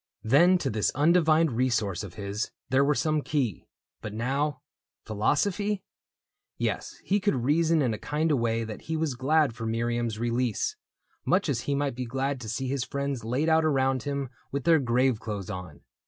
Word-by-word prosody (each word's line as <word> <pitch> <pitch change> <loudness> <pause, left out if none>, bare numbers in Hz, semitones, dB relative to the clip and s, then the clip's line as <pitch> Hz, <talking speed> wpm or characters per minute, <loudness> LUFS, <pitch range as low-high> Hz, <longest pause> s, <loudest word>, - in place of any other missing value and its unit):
Then 170 +11 +5
to 140 -6 -2
this 105 -1 +1
undivined 160 +1 +4
resource 115 -6 0
of 95 -3 -9
his 100 +1 -3 0.2
There 135 +1 +4
were 145 +1 +2
some 155 +4 +1
key; 130 - -2 0.3
but 105 0 -6
now... 140 +6 -1 0.4
Philo 110 +5 +1
sophy? 205 +3 -1 0.7
Yes, - - -2
he 200 +2 +1
could 205 -5 +1
reason 160 +3 +3
in 120 -4 +1
a 105 - -5
kind 155 +2 0
of 140 - +2
way 115 0 0
That 110 -1 -7
he 160 0 -3
was 155 -3 0
glad 140 +2 +2
for 115 -1 -5
Miriam's 115 0 -1
release 120 0 -1 0.3
— - - -41
Much - - +2
as - - 0
he 140 - +2
might 140 -1 0
be 125 +1 -4
glad 135 +2 -2
to 110 - -6
see 130 +4 -2
his 135 -1 -1
friends 140 -2 -3
Laid 125 +8 0
out 160 0 +4
around 135 -4 +2
him 140 -1 -3 0.2
with 140 -1 -2
their 165 -2 +5
grave 125 -2 +2
clothes 105 -4 -5
on. 90 -2 -8
130 Hz, 190 wpm, -27 LUFS, 115-150 Hz, 0.7 s, Then